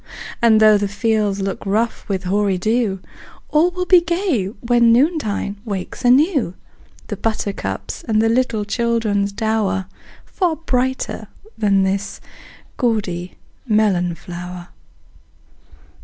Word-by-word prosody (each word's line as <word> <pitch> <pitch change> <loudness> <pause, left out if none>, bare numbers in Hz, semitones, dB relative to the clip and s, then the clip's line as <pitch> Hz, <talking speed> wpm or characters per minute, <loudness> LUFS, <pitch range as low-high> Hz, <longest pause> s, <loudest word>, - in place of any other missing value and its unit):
And 225 -2 +5
though 215 -1 +6
the 205 - 0
fields 210 -1 0
look 195 0 -3
rough 215 +4 -1
with 190 -1 -1
hoary 195 0 +1
dew, 215 -1 0 0.5
All 315 +4 +3
will 360 0 -3
be 360 -1 +6
gay 340 - 0
when 235 +3 +2
noontide 235 - +1
wakes 200 0 -5
anew 260 - +3 0.5
The 210 - -4
buttercups, 200 - -3
the 220 0 +2
little 230 -2 +1
children's 215 -3 0
dower 205 -3 -1 0.4
Far 355 -5 -1
brighter 260 -4 -2 0.3
than 200 -3 +2
this 195 +1 -2 0.6
gaudy 195 -8 -1 0.3
melon 195 -6 +2
flower! 175 +1 -8
215 Hz, 110 wpm, -19 LUFS, 195-240 Hz, 0.6 s, though